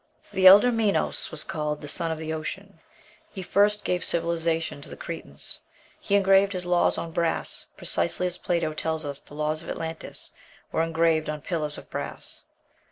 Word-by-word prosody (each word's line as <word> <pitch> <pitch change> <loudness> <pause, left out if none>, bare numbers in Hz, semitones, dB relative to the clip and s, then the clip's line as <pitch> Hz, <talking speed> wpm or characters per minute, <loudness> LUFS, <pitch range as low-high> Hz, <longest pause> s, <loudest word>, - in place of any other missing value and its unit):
The 190 0 +6
elder 205 +6 +9
Minos 225 -3 +1
was 160 - -4
called 150 -1 -3
"the 145 - -7
Son 165 +3 -1
of 160 - -2
the 160 0 -4
Ocean:" 155 0 -6 0.5
he 190 - -7
first 205 +2 +2
gave 180 0 0
civilization 165 -2 0
to - - -11
the - - -9
Cretans; 160 - -8 0.4
he 200 - 0
engraved 195 0 +5
his 180 -1 -4
laws 175 0 +2
on 165 - -4
brass, 170 0 -1
precisely 85 - +1
as 180 0 -3
Plato 170 -3 0
tells 160 0 -2
us 140 -1 -4
the 145 - -14
laws 155 +1 -1
of - - -9
Atlantis 160 0 -5 0.4
were - - +1
engraved 165 -1 +2
on 150 -1 -4
pillars 150 -3 -1
of - - -10
brass. - - -6
165 Hz, 175 wpm, -26 LUFS, 155-180 Hz, 0.5 s, elder